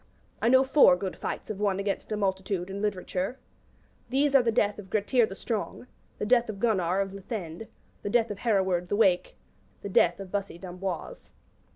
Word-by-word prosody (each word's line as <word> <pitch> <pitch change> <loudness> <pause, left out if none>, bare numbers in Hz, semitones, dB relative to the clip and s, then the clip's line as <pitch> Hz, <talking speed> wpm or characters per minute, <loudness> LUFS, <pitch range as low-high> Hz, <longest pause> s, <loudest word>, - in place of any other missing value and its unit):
I 230 - +3
know 260 +1 +6
four 265 -8 +6
good 185 0 -4
fights - - -5
of 205 - -6
one 200 -2 +1
against 200 +2 -3
a 215 - 0
multitude, 190 -2 -2
in 200 +1 -5
literature. 195 +2 -2 0.7
These 275 +2 +2
are 270 - +7
the 235 -1 +1
Death 210 -1 +1
of 190 -2 -10
Gretir 220 +3 +2
the 195 - -8
Strong, 220 +3 -4 0.3
the - - -3
Death 240 +1 +3
of 205 -2 -5
Gunnar 195 -4 +1
of 195 -1 -3
Lithend, 195 -1 -6 0.3
the - - -3
Death 230 0 +2
of 200 - -6
Hereward 190 -6 +1
the 205 - -1
Wake, 190 -4 +2 0.5
the 200 - -4
Death 175 -1 +3
of 195 -2 -8
Bussy 200 -3 -3
d'Amboise. 180 -1 -6
200 Hz, 190 wpm, -28 LUFS, 190-225 Hz, 0.7 s, are